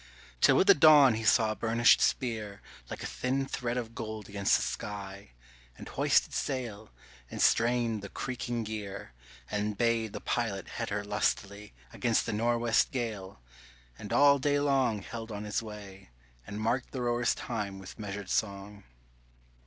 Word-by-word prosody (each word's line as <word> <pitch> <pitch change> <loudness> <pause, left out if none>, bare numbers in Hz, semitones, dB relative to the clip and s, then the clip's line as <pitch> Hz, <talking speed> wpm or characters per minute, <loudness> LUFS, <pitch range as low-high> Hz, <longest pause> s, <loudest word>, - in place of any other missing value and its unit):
Till - - +6
with - - +4
the 200 - +8
dawn 150 -5 +7
he 110 +1 -3
saw 110 0 +4
a - - -3
burnished 115 +1 +4
spear 110 -6 -1 0.3
Like - - -6
a - - -4
thin 135 +2 -2
thread 125 -2 -3
of 115 -2 -4
gold 110 -3 -6
against 100 -1 +2
the - - 0
sky, 100 - -6 0.4
And - - -10
hoisted - - +2
sail, 115 -6 -4 0.4
and - - -7
strained 115 -2 +2
the 100 - -8
creaking 120 -1 -4
gear, 105 - -6 0.4
And 105 0 -2
bade 115 -2 +1
the - - -5
pilot 110 -5 -2
head 115 -1 -4
her 105 0 -3
lustily 100 -1 -2 0.2
Against 115 -2 +1
the 115 - -3
nor'west 120 +1 +2
gale, 105 - -5 0.6
and 105 - -8
all 140 0 +5
day 145 +1 +1
long 130 -7 +1
Held 115 -1 -7
on 105 0 -5
his 105 +1 -2
way, 100 - -10 0.4
and 105 - -6
marked 120 +4 -1
the 130 - -3
rowers' 120 0 +1
time 105 -5 -4
with 95 +3 -11
measured 100 -2 -6
song. 100 -1 -3
110 Hz, 160 wpm, -30 LUFS, 105-120 Hz, 0.6 s, the